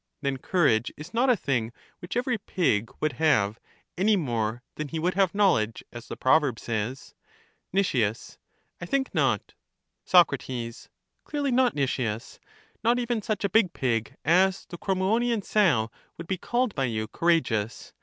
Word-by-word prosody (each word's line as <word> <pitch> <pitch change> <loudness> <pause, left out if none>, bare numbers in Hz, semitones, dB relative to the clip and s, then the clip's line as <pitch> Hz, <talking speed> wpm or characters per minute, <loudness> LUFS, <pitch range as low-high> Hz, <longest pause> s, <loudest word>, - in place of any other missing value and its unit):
Then 140 -1 0
courage 130 - +2
is 155 +4 -10
not 245 +3 +2
a 250 - +6
thing 120 -8 -1 0.3
which 175 +5 -5
every 245 -2 0
pig 120 - 0
would 155 - 0
have, 110 -9 +3 0.4
any 205 +4 +3
more 120 - -2
than 155 - -5
he 160 - -5
would 175 +3 0
have 195 -1 +1
knowledge, 115 - +2
as 120 -1 -9
the - - -7
proverb 135 -3 +3
says? 115 +3 -4 0.6
Nic. 195 0 +1
I 115 +7 -4
think 270 +3 -1
not. 135 - 0 0.5
Soc. - - +6
Clearly 130 - -6
not, 250 0 +3
Nicias; 125 -5 -2 0.4
not 235 +2 +3
even 240 -2 -1
such 210 -1 -2
a 200 - +1
big 195 -3 +3
pig 115 -4 -1
as 185 +4 +3
the 175 - -9
Crommyonian 210 +4 +1
sow 155 - +2 0.3
would 170 - -7
be 185 +1 -3
called 240 +1 0
by 135 - 0
you 110 -3 -2
courageous. 115 -8 0
160 Hz, 155 wpm, -26 LUFS, -, 0.6 s, a